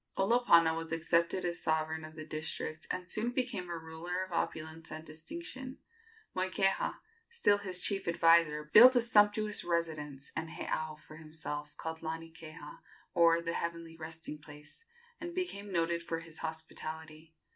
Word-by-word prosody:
Olopana 195 -6 +5
was 165 0 -5
accepted 170 +2 +1
as 175 0 -2
sovereign 160 0 0
of 155 0 -10
the 155 -1 -7
district, 155 0 -3
and 180 0 -3
soon 215 +5 0
became 245 -8 -2
a 170 - -3
ruler 165 +3 -4
of 185 - -9
opulence 160 -1 -3
and 155 +1 -7
distinction. 260 - -6 0.6
Moikeha, 190 +1 +1 0.3
still 205 - +3
his 185 -3 -2
chief 195 0 +1
adviser, 165 -2 +5
built 235 +12 +9
a 245 - +5
sumptuous 210 -1 +3
residence 155 -5 -2
and 160 - -3
heiau 155 -1 -3
for 155 0 -13
himself, 155 -2 -6
called 160 0 -4
Lanikeha, 160 -2 -7 0.3
or 170 -1 +5
"the 170 0 -2
heavenly 170 -1 -3
resting 160 -1 -7
place," 150 - -12 0.4
and 345 0 -6
became 205 - -3
noted 170 -1 +1
for 165 -1 -3
his 165 -1 -8
hospitality. 160 0 -6
165 Hz, 145 wpm, -33 LUFS, 160-185 Hz, 0.6 s, built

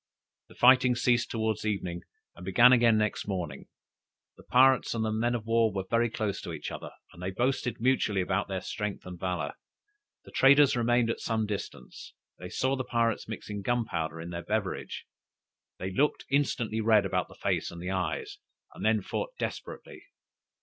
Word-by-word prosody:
The - - -17
fighting 125 0 +6
ceased 120 0 +2
towards 110 -2 -1
evening, 95 -5 -2 0.3
and 90 - -12
began 120 +7 +6
again 120 -3 +5
next 105 -1 -1
morning. 85 -8 -4 0.7
The - - -16
pirates 130 -1 +4
and 110 -1 0
the 110 - -1
men 120 +3 0
of 110 -2 -4
war 115 -1 +3
were 95 -1 -3
very 115 0 +3
close 105 -2 -3
to - - -6
each - - -6
other, - - -7 0.2
and 85 - -13
they 90 - -2
boasted 125 +4 -1
mutually 115 -5 +2
about 95 +2 0
their 95 -1 -3
strength 105 0 -4
and 90 -1 -8
valor. 90 -6 -2 0.7
The - - -13
traders 140 +1 +5
remained 120 -1 +2
at - - -5
some 110 -1 -1
distance; 95 - -7 0.2
they 90 - -7
saw 130 +7 0
the 130 - -3
pirates 115 -2 0
mixing 105 -2 -6
gunpowder 90 -9 -2
in 85 +1 -7
their 85 0 -4
beverage, 105 -3 -3 0.7
they 95 +1 -4
looked 145 +10 +1
instantly 120 -6 0
red 110 -2 +4
about 95 - -1
the - - -15
face - - -1
and 85 - -9
the 90 +2 -4
eyes, 90 -7 -3 0.3
and - - -9
then 110 -2 +2
fought - - -4
desperately. - - -6
110 Hz, 175 wpm, -29 LUFS, 95-120 Hz, 0.7 s, fighting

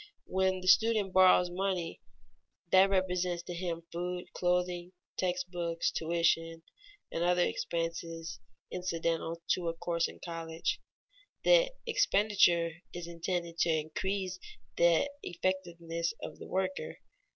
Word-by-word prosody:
When 190 0 +1
the 185 - -6
student 215 -2 +4
borrows 185 -1 +6
money 185 -2 -2 0.7
that 190 +1 +7
represents 180 -2 0
to 175 - -6
him 170 -1 -3
food, 180 +1 -3
clothing, 180 0 0 0.2
text 180 0 -1
books, 170 -1 -1
tuition, 165 0 +1 0.5
and 165 - -1
other 180 0 +3
expenses 165 -1 -3 0.3
incidental 165 -2 -2
to 180 -2 +1
a 165 - -1
course 170 0 0
in - - -11
college, 165 -1 -3 0.6
the - - +5
expenditure 200 - +3 0.2
is 175 -1 -6
intended 170 0 -3
to 170 - +3
increase 185 +4 -1 0.4
the 170 +9 +4
effectiveness 170 -1 -2
of - - -7
the - - -8
worker. 190 0 -2
175 Hz, 120 wpm, -32 LUFS, 170-185 Hz, 0.7 s, that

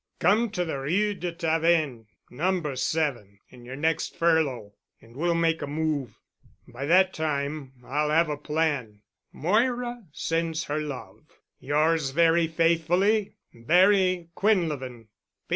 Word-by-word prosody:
Come 225 +3 +2
to 180 -3 -1
the 150 -4 -4
Rue 195 +10 0
de 175 -2 -4
Tavennes, 160 - 0 0.2
No. 165 +1 -1
7, 130 -7 -2
in 125 -1 -15
your 130 +2 -7
next 160 +3 -1
furlough, 145 -11 +1 0.3
and 115 +1 -19
we'll 170 +4 0
make 165 -1 +1
a - - -4
move. 150 -3 -2 0.5
By 125 +3 -6
that 185 +3 +4
time 145 -3 -3
I'll 150 +2 -1
have 165 +2 +3
a 150 - -2
plan. 145 -8 -2 0.3
Moira 240 - -1
sends 165 +1 -2
her 150 +1 -2
love. 145 -4 -7 0.4
"Yours 150 +1 +1
very 165 +3 +3
faithfully, 175 +6 +1 0.2
"BARRY 185 - +3
QUINLEVIN. 150 - -1
160 Hz, 125 wpm, -26 LUFS, 140-175 Hz, 0.5 s, that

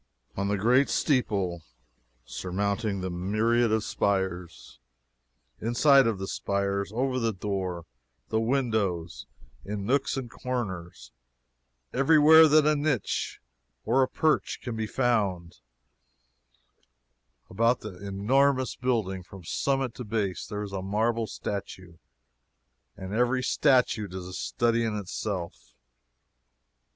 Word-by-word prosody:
On 100 0 -1
the 100 0 0
great 125 +7 +3
steeple 100 - 0 0.6
surmounting 100 - -2
the 95 0 -3
myriad 110 +6 +1
of 110 -1 +1
spires 95 -4 -2 0.8
inside 135 +3 +4
of 110 -3 0
the 95 0 -5
spires 100 0 -2
over 130 +3 -1
the 115 -2 +1
doors, 95 -4 -4 0.4
the 110 - +1
windows 110 -9 -1 0.4
in 100 0 -5
nooks 135 +4 +1
and 130 -2 -4
corners 110 -9 -5 0.8
every 140 +5 +4
where 160 +2 +8
that 155 0 +5
a 155 0 +4
niche 145 -6 -1 0.5
or 130 +4 +3
a 130 - +3
perch 155 +3 0
can 120 -3 -4
be 110 -1 -2
found 100 -9 -1 1.9
about 115 +5 +1
the 100 -4 -8
enormous 130 +7 +1
building, 110 -7 -1
from 90 +1 -13
summit 135 +7 -1
to 125 - -7
base, 105 -4 -2
there 105 0 -4
is 100 - -7
a 95 - -3
marble 110 +4 0
statue, 95 -4 -6 1.0
and 95 +1 -7
every 125 +3 +1
statue 125 -8 +2
is 90 0 -7
a 90 - -9
study 115 +4 0
in 110 -2 -1
itself! 95 -2 -5
110 Hz, 120 wpm, -27 LUFS, 95-125 Hz, 1.9 s, where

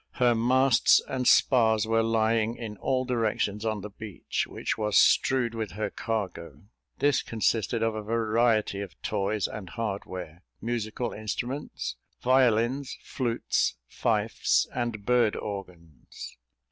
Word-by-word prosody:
Her 125 -2 +3
masts 125 +2 +4
and 130 -2 -2
spars 110 -4 +4
were 115 0 +2
lying 115 0 +1
in 110 -3 -7
all 130 +3 0
directions 110 -4 -1
on 110 -2 -1
the 105 +1 -8
beach, 105 -2 -4
which - - -3
was 105 -1 +1
strewed 125 -3 +4
with 110 -3 -4
her 105 +2 -3
cargo. 90 - -4 0.3
This 145 -2 +2
consisted 115 0 0
of 115 -1 +1
a 110 - -4
variety 110 -1 +1
of 100 - -9
toys 105 0 -1
and 95 -4 -8
hardware, 95 -6 -5 0.2
musical 115 +1 -3
instruments, 115 - -4 0.2
violins, 130 +1 +2
flutes, 120 -3 -1
fifes, - - +1
and 120 -4 -3
bird 120 -3 +3
organs. 90 -9 -8
110 Hz, 125 wpm, -27 LUFS, 105-120 Hz, 0.3 s, masts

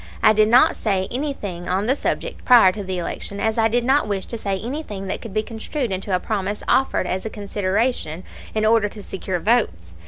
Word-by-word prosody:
I 215 - +7
did 215 0 +4
not 245 +2 +6
say 190 -3 0
anything 225 - -3
on 190 +3 0
the 260 +4 +2
subject - - -3
prior 235 -7 +7
to 205 +2 -6
the 185 -1 -4
election, 200 +3 -4
as 220 +2 0
I 225 - +4
did 240 +2 +1
not 275 +3 +3
wish 200 -2 -2
to 230 - -4
say 195 -2 -1
anything 230 -5 -5
that 190 - -4
could 230 - -8
be 215 +2 0
construed 230 +2 -4
into 190 0 -1
a - - +1
promise 205 0 -3
offered 265 -7 +2
as 185 +1 -2
a 220 - -3
consideration 200 -3 -1 0.3
in 215 0 +1
order 220 -1 +3
to 205 0 -10
secure 190 -1 -3
votes. 165 - 0
210 Hz, 215 wpm, -22 LUFS, 190-230 Hz, 0.3 s, I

